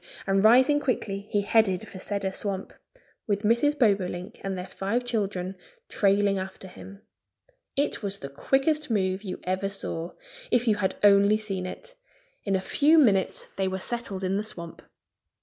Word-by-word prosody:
And 195 0 +2
rising 255 +6 +6
quickly 205 -7 -2
he 205 - +1
headed 200 -3 +2
for 190 - -9
Cedar 200 0 -2
Swamp, 195 -1 -4 0.5
with 205 0 0
Mrs. 235 +7 +2
Bobolink 195 -6 0
and 195 -1 -3
their 180 - -5
five 200 +6 -2
children 195 -5 -2 0.3
trailing 200 -1 +2
after 190 0 -7
him. 195 +2 -12 0.7
It 285 +2 0
was 200 -2 -1
the 140 - -7
quickest 275 - 0
move 190 -3 0
you 195 -3 -6
ever 185 +2 -1
saw 175 -4 -3 0.4
if 245 0 +2
you 215 -2 +3
had 190 -2 -1
only 200 +1 +6
seen 195 -4 -4
it! - - -9 0.5
In 195 -2 +1
a 190 - 0
few 300 +10 +3
minutes 205 -11 +2
they 190 -1 +1
were 190 0 -2
settled 200 -2 -4
in 190 +1 0
the 210 - -1
swamp. 170 -6 -8
200 Hz, 165 wpm, -26 LUFS, 190-225 Hz, 0.7 s, rising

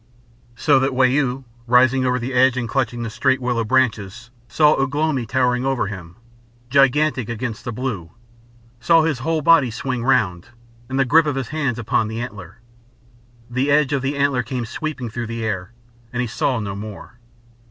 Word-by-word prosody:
So 140 +2 +3
that 135 0 0
Wau, 130 0 +2 0.2
rising 130 +2 +4
over 125 0 +1
the 125 +1 -4
edge 130 0 +4
and 120 -2 -2
clutching 120 -2 -1
the 115 - -4
straight 130 +3 +1
willow 120 -2 -1
branches, 115 -2 -1 0.2
saw 150 +7 +4
Ugh 135 +1 -1
lomi 150 -6 0
towering 125 0 +1
over 135 -4 0
him, 90 -4 -8 0.6
gigantic 135 -2 +3
against 115 -1 -4
the 120 - -3
blue; 110 -8 -4 0.7
saw 160 +7 +4
his 155 -6 -1
whole 160 +3 -1
body 155 -6 +5
swing 120 +1 -4
round, 90 -9 +1 0.4
and 135 +1 -2
the 135 - +3
grip 155 +5 +4
of 145 - -1
his 135 -3 -3
hands 140 -6 -1
upon 115 -1 0
the 110 +1 -5
antler. 100 -7 -8 0.9
The 130 +4 -1
edge 145 0 +3
of 140 - 0
the 140 +2 -2
antler 140 -3 +2
came 125 +1 -4
sweeping 130 -1 -5
through 120 0 -4
the 115 0 -4
air, 95 -2 -3 0.4
and 125 - -4
he 125 - 0
saw 120 +2 -1
no 100 -3 -4
more. 105 +3 -9
125 Hz, 180 wpm, -21 LUFS, 115-135 Hz, 0.9 s, body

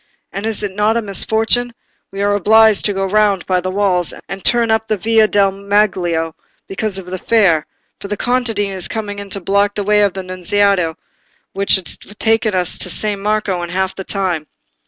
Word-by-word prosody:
And 200 +3 -4
is 220 -1 -1
it 205 - -2
not 210 +2 +2
a - - 0
misfortune?—we 220 0 -1
are 205 0 +2
obliged 215 +1 +4
to 205 - +1
go 195 0 -1
round 200 -1 +1
by 185 -1 +1
the 185 - -3
walls 185 -3 0
and 195 -1 -7
turn 235 -2 +3
up 220 0 +1
the 215 - 0
Via 220 +2 +3
del 200 -2 +2
Maglio, 190 -5 0 0.3
because 195 0 -3
of 190 - -7
the 185 +1 -6
Fair; 185 -10 +2 0.3
for - - -7
the 205 0 -3
contadine 220 -6 -1
coming 205 -2 -4
in 200 0 -8
block 200 +2 +1
up 205 - -37
the 205 - -2
way 210 +1 +3
by 205 - +5
the 190 0 -7
Nunziata, 185 -2 0 0.6
which 195 +1 +3
would 190 -3 -2
have 210 - -15
taken 225 -2 +1
us 180 -2 -1
to - - -2
San 205 +2 -1
Marco 210 -3 -1
in 175 - -5
half 190 +1 -1
the 190 - -7
time." 180 -6 -2
200 Hz, 200 wpm, -17 LUFS, 185-215 Hz, 0.6 s, by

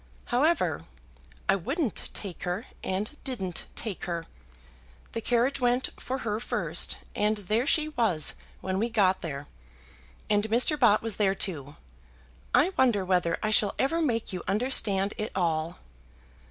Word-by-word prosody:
However, 310 +8 +2 0.6
I 195 - +5
wouldn't 265 - -2
take 195 -5 -5
her, 180 +6 -2 0.2
and 200 +9 -2
didn't 195 - -3
take 215 -5 -2
her. 170 -2 -3 0.9
The 230 - -3
carriage 245 +4 +1
went 245 +1 +2
for 260 - -2
her 210 -1 -1
first, 240 - 0 0.2
and 210 +1 +2
there 215 +6 0
she 310 0 +2
was 225 - +3 0.3
when 190 0 -1
we 230 +3 0
got 195 -5 +3
there; 145 -3 -5 0.8
and 205 0 +2
Mr. 245 +7 +3
Bott 220 -5 +5
was 225 -3 -3
there 195 -2 +2
too. 150 -8 -4 0.8
I 340 +8 +4
wonder 230 -7 +3
whether 180 -2 +2
I 215 - +1
shall 210 -2 +3
ever 330 +5 +1
make 230 -9 0
you 180 - -3
understand 205 -2 +2
it 215 - -2
all." 165 -2 0
210 Hz, 145 wpm, -28 LUFS, 185-245 Hz, 0.9 s, I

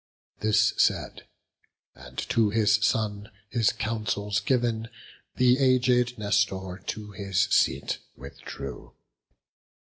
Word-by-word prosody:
This 110 0 +3
said, - - 0 0.7
and 65 0 -14
to 110 -2 +3
his 105 0 +2
son 105 -1 0 0.2
his 115 -2 +2
counsels 105 -2 -2
giv'n, 120 -4 0 0.5
The 125 +1 +4
aged 125 -2 +3
Nestor 100 -3 -1
to 105 -1 -5
his 95 -2 -1
seat - - +1 0.2
withdrew. 70 +2 -9
110 Hz, 95 wpm, -26 LUFS, 100-115 Hz, 0.7 s, The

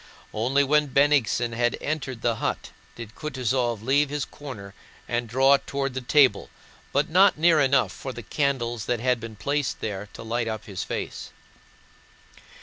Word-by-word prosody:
Only 130 +6 +2
when 150 +2 +3
Bennigsen 135 -4 +2
had 120 +1 0
entered 130 -6 -4
the 115 -1 +1
hut - - -3 0.2
did 115 -2 -9
Kutúzov 125 -6 -2
leave 140 +4 +2
his 145 -1 -2
corner 110 -9 -10 0.3
and 120 -1 -2
draw 135 +4 +5
toward 140 -1 -3
the 130 - -3
table, 135 +1 +3 0.4
but 140 +2 +1
not 185 +2 +5
near 165 0 +4
enough 130 -7 +3
for 110 +11 -7
the 120 -2 -8
candles 120 -4 -1
that 120 - -1
had 125 0 +1
been 115 -1 -8
placed 140 +4 -2
there 100 -1 -5
to - - -9
light 115 +1 -2
up 110 -1 -4
his 100 -4 -5
face. - - -5
130 Hz, 160 wpm, -25 LUFS, 115-140 Hz, 0.4 s, draw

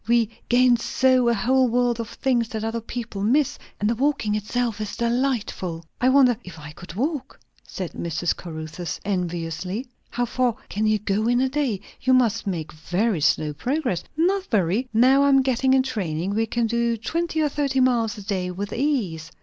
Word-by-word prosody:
"We 230 -2 +3 0.2
gain 245 0 +5
so 255 +1 +2
a - - +3
whole 255 +5 +3
world 240 0 +1
of 230 - -4
things 240 -4 0
that 220 -3 -4
other 225 +1 -2
people 230 -3 -6
miss. 260 +7 +2 0.2
And 210 - +1
the 230 - +2
walking 265 -4 0
itself 215 +1 -1
is 210 - -4
delightful." 235 -9 -1 0.2
"I 255 - +4
wonder 260 -2 +5
if 185 -2 -10
I 150 -1 -9
could 170 +2 -11
walk?" 285 - -3 0.3
said 185 -3 -5
Mrs. 170 +1 -1
Caruthers 160 0 -6
enviously. 180 - -3 0.2
"How 245 0 -1
far 245 -1 0
can 215 +2 0
you 215 0 +3
go 210 +1 -1
in 245 +1 +3
a 265 +1 +2
day? 260 -8 -1 0.2
You 260 - +3
must 225 -4 +2
make 165 -5 -3
very 175 +4 -1
slow 150 0 +2
progress?" 245 - -1
"Not 375 +4 +2
very. 210 +4 +1
Now 255 +5 +5
I 280 - +4
am 270 -1 +5
getting 260 0 +1
in 260 - +4
training, 190 -7 -2
we 225 +2 +1
can 235 +1 0
do 235 0 0
twenty 325 +8 -2
or 305 - +3
thirty 275 -2 0
miles 240 -4 +2
a 205 - -8
day 190 -3 -1
with 195 +3 -5
ease." 205 - -1
230 Hz, 190 wpm, -24 LUFS, 195-255 Hz, 0.3 s, gain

